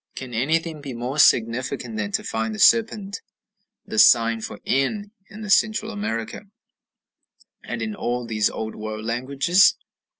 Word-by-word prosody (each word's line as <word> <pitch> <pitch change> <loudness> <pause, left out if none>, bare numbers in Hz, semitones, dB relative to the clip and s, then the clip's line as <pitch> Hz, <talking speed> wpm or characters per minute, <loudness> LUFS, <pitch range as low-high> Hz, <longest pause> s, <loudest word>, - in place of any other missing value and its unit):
Can 130 -2 -8
anything 155 +6 -1
be 135 -4 -7
more 125 +5 -4
significant 120 -1 +2
than 105 -1 -3
to - - -1
find 110 -1 -3
the - - -9
serpent 215 -3 +2 0.6
the 110 - -2
sign 115 -1 +5
for 105 - -7
n 205 +10 -1 0.2
in 215 0 -9
Central 215 +2 +2
America, 200 - -5 1.2
and - - -5
in 220 - -4
all 125 -9 -3
these 110 -2 0
Old 110 0 -5
World 110 0 -6
languages? 135 - +3
125 Hz, 140 wpm, -23 LUFS, -, 1.2 s, sign